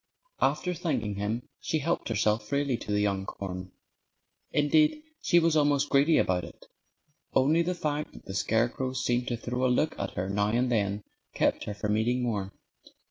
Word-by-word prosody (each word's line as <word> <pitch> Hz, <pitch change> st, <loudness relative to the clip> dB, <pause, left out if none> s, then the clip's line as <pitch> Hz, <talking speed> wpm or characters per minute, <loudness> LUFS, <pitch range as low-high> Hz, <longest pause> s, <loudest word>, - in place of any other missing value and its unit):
After 180 Hz, -, +1 dB
thanking 130 Hz, -, -2 dB
him 110 Hz, +4 st, -2 dB
she 160 Hz, -, -1 dB
helped 160 Hz, -1 st, -1 dB
herself 105 Hz, 0 st, +1 dB
freely 140 Hz, -1 st, 0 dB
to 115 Hz, -, -6 dB
the 105 Hz, 0 st, +2 dB
young 100 Hz, -2 st, 0 dB
corn. 90 Hz, -1 st, -6 dB, 0.8 s
Indeed, 155 Hz, -, +3 dB, 0.2 s
she 175 Hz, -, +3 dB
was 165 Hz, -2 st, +4 dB
almost 145 Hz, -1 st, +2 dB
greedy 145 Hz, +3 st, +5 dB
about 90 Hz, -1 st, +2 dB
it. -, -, -11 dB, 0.7 s
Only 150 Hz, +6 st, +4 dB
the 180 Hz, +2 st, -1 dB
fact 150 Hz, -2 st, -2 dB
that -, -, -14 dB
the 95 Hz, -, -6 dB
scarecrow 120 Hz, +6 st, 0 dB
seemed 125 Hz, -1 st, 0 dB
to 120 Hz, -, -1 dB
throw 125 Hz, +2 st, -3 dB
a 130 Hz, -, +4 dB
look 155 Hz, +5 st, +2 dB
at 100 Hz, -, -4 dB
her 90 Hz, +2 st, -2 dB
now 100 Hz, +1 st, +1 dB
and 120 Hz, +3 st, +1 dB
then 100 Hz, -2 st, 0 dB, 0.3 s
kept -, -, +1 dB
her 105 Hz, -, -4 dB
from 105 Hz, +1 st, 0 dB
eating 120 Hz, +3 st, +1 dB
more. 100 Hz, -5 st, -2 dB
120 Hz, 180 wpm, -28 LUFS, 105-145 Hz, 0.8 s, greedy